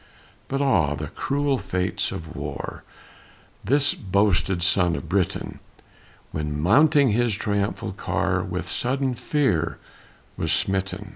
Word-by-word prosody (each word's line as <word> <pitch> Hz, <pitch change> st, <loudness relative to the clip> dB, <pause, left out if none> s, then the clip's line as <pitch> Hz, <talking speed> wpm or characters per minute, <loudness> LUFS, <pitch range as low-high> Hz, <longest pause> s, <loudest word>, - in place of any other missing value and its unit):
But 135 Hz, +1 st, -1 dB
ah, 80 Hz, -, +2 dB
the 75 Hz, +1 st, -5 dB
cruel 140 Hz, -, 0 dB
fates 90 Hz, 0 st, -2 dB
of 80 Hz, 0 st, -7 dB
war! 75 Hz, -1 st, -6 dB, 0.8 s
This 140 Hz, +2 st, +3 dB
boasted 95 Hz, -2 st, +1 dB
son 90 Hz, -1 st, +3 dB
of 70 Hz, -, -6 dB
Britain, -, -, -1 dB, 0.7 s
When 75 Hz, -1 st, -3 dB
mounting 140 Hz, -, +5 dB
his 115 Hz, 0 st, +1 dB
triumphal 100 Hz, -1 st, -2 dB
car, 95 Hz, -, -1 dB
With -, -, -4 dB
sudden 130 Hz, +1 st, 0 dB
fear 85 Hz, -, 0 dB, 0.6 s
was -, -, -1 dB
smitten. 95 Hz, +1 st, 0 dB
100 Hz, 120 wpm, -24 LUFS, 85-130 Hz, 0.8 s, mounting